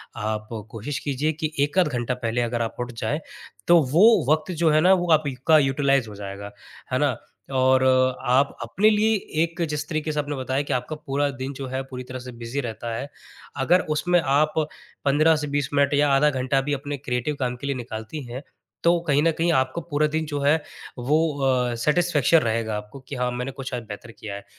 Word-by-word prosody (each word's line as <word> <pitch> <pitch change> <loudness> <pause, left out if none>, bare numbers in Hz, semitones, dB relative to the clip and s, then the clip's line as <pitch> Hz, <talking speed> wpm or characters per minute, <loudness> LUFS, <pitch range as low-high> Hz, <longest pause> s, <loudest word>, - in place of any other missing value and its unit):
आप 110 0 -3 0.2
कोशिश 120 +6 -4
कीजिए 145 +2 -1
कि 155 - 0
एक 145 +5 +1
आध 180 - +4
घंटा 125 -3 -2
पहले 115 +2 0
अगर 120 0 -1
आप 115 - -3
उठ 120 0 -3
जाएँ 120 +7 -1 0.5
तो 175 0 +7
वो 180 +7 +7 0.3
वक़्त 155 +3 +1
जो 165 - +5
है 155 0 +4
ना 185 +3 +6
वो 175 -2 +1
आपका 150 0 +3
यूटिलाइज 135 -2 +2
हो 105 - -9
जाएगा। 100 0 -7 0.4
है - - +2
ना? - - +1 0.3
और 130 0 +3 0.5
आप 135 +3 +3
अपने 190 - +2
लिए 220 +1 +3 0.3
एक 170 +1 -4
जिस 150 0 -3
तरीके 155 -1 -2
से 150 - -2
आपने 145 0 -2
बताया 130 +1 -1
कि - - +1
आपका 125 +5 -2
पूरा 145 +1 0
दिन 135 +2 -3
जो 135 - -4
है 130 +1 -3
पूरी 125 0 -5
तरह 130 0 -5
से 125 0 -9
बिजी 120 +5 -3
रहता 115 -1 -5
है। 140 +5 -5 0.6
अगर 180 +4 +4 0.2
उसमें 175 +2 +3
आप 150 +2 +2 0.5
15 155 +3 +4
से - - -6
20 145 -3 0
मिनट 140 0 +3
या 145 0 +3
आधा 150 +2 +4
घंटा 135 0 0
भी 145 +2 -2
अपने 145 +1 -4
क्रिएटिव 125 +2 -2
काम 125 -2 -1
के 140 - -6
लिए 140 - -1
निकालती 120 +4 -6
हैं 130 +4 -6 0.4
तो 170 0 +4
कहीं 145 0 +3
न 165 - +4
कहीं 170 +1 +2
आपको 130 +3 0
पूरा 150 -1 0
दिन 160 +1 -2
जो 145 -1 -3
है 140 +1 +3 0.5
वो 130 +5 +1 0.3
अ, 125 -2 +1
सैटिस्फैक्शन 155 +4 +3
रहेगा 115 -3 -1
आपको 105 +5 -9
कि 135 +2 -8
हाँ, 125 -1 0
मैंने 125 +2 -4
कुछ 135 -1 -7
आज 120 -2 -3
बेहतर 105 +2 -8
किया 105 -2 -8
है। 100 - -8
135 Hz, 210 wpm, -24 LUFS, 125-150 Hz, 0.6 s, तो